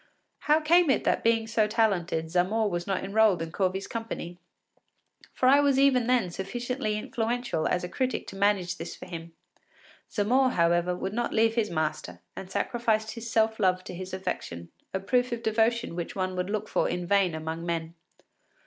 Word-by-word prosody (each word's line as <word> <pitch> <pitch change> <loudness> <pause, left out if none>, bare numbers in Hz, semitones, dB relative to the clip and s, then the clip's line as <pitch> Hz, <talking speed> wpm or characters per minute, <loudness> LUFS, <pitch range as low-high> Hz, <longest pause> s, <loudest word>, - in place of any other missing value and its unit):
” - - -50
How 300 +1 +5
came 335 +1 +4
it 270 - +2
that - - +1
being 225 -1 +3
so 220 -1 +1
talented, 190 -7 0
Zamore 200 +5 +1
was 175 +1 -3
not 195 -2 -1
enrolled 205 -1 +3
in 165 0 -5
Corvi’s 190 +2 -1
company? 225 -6 -6 0.9
For - - -2
I 275 +2 +7
was 285 -2 +3
even 265 -3 +4
then 245 -8 +2
sufficiently 225 +4 -3
influential 230 -5 -2
as 180 - 0
a - - -2
critic 255 +7 -2
to - - -10
manage 195 -3 +1
this - - -6
for - - -10
him. 170 -2 -8 0.8
Zamore, 250 +5 +2
however, 175 +1 +2
would 190 +2 -4
not 240 +2 -1
leave 225 0 +3
his 225 -3 0
master, 155 -2 -3 0.2
and 190 - -8
sacrificed 220 +1 0
his 230 0 -7
self 220 0 +2
love 185 -2 +2
to - - -8
his 185 +1 -7
affection, 180 - -5 0.2
a 190 - -2
proof 245 +5 +1
of 235 -1 -4
devotion 225 -1 +1
which 170 -1 -5
one 185 -1 -2
would 180 +1 -2
look 215 0 -2
for - - 0
in 175 0 -3
vain 195 -3 +2
among 160 +1 -5
men. 165 -1 -3
205 Hz, 185 wpm, -27 LUFS, 180-230 Hz, 0.9 s, I